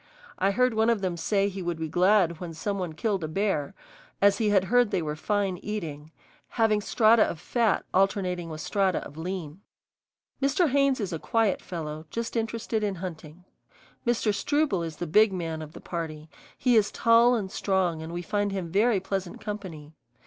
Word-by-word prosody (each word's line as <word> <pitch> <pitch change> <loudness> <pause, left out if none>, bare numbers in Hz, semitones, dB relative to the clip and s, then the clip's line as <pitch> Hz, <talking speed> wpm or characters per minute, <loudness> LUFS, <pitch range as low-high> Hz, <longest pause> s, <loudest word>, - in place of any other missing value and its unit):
I 195 - +3
heard 250 +4 +2
one 220 +1 +2
of 230 -4 +1
them 185 -3 -1
say 195 +4 +1
he 195 -1 -5
would 175 -2 -2
be 160 0 -3
glad 180 0 +3
when 170 -3 -7
some 200 +4 -3
one 175 -3 -3
killed 195 +2 -1
a - - -2
bear, 155 -4 -1 0.4
as 200 0 +4
he 215 -2 +2
had 195 -2 +4
heard 245 +3 +3
they 190 -5 -1
were 150 -1 -3
fine 195 +2 -1
eating, 160 -8 -5 0.4
having 220 -3 +2
strata 220 +1 +4
of 170 - +1
fat 225 +4 +1
alternating 185 -3 +1
with 155 -1 -6
strata 190 +2 0
of 145 - -11
lean. 170 0 -5 0.8
Mr. 285 +5 +2
Haynes 275 -1 +2
is 195 -5 -3
a 165 - -3
quiet 225 0 +1
fellow, 155 -2 -6
just 230 +1 -4
interested 225 -1 -2
in 200 -2 -1
hunting. 170 -1 -8 0.6
Mr. 235 -3 +1
Struble 275 - +1
is 165 -2 -5
the 175 - -4
big 210 +6 +4
man 165 -4 -4
of 155 0 -9
the - - -10
party; 160 -3 -6 0.3
he 250 -2 +3
is 210 -2 +4
tall 235 +1 +5
and 195 -5 -3
strong 185 -5 0
and 160 +1 -7
we 175 +1 -4
find 205 +3 -1
him 185 -4 -4
very 210 +2 +3
pleasant 190 -1 -4
company. 180 -8 -7
195 Hz, 190 wpm, -27 LUFS, 165-215 Hz, 0.8 s, tall